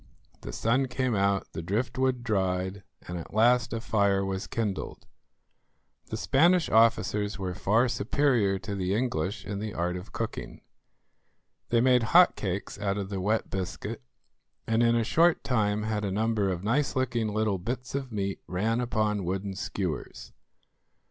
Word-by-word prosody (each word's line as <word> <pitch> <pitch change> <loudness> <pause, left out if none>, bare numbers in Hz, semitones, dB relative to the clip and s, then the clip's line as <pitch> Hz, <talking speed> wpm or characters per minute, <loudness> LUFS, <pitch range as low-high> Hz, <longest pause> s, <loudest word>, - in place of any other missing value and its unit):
The - - -6
sun 125 - +1
came 130 -1 -1
out, 100 -1 0
the - - -4
driftwood 125 +7 -1
dried, 95 -3 -1 0.3
and 90 0 -4
at 85 - -10
last 120 +1 +4
a 115 - -2
fire 100 -3 +1
was 95 +1 -3
kindled. 105 -4 -3 1.0
The - - -4
Spanish 170 +5 +3
officers 105 -2 +3
were 95 -2 -3
far 110 +7 +2
superior 115 -3 +1
to 105 +1 -6
the 95 0 -1
English 105 -4 -2
in 100 0 -4
the 105 -1 -5
art 90 +1 -1
of 90 - -8
cooking. - - -5 1.1
They 115 -1 +3
made 125 0 +4 0.2
hot 180 0 +7
cakes 100 0 -4
out 100 -1 -1
of 100 -2 -4
the 95 -2 -3
wet 110 +4 0
biscuit, 95 -7 -4 0.6
and 115 +1 +1
in 120 0 +4
a 115 - +2
short 165 +8 +3
time 105 -4 +1
had 105 -1 -2
a 100 - -1
number 105 0 +1
of 90 -1 -3
nice 130 +7 +1
looking 125 -4 0
little 110 -2 0
bits 125 +7 -5
of 135 -2 -3
meat 100 -2 -2
ran 110 +6 0
upon 105 -4 0
wooden 95 +2 -3
skewers. 95 -4 -4
105 Hz, 160 wpm, -28 LUFS, 95-120 Hz, 1.1 s, hot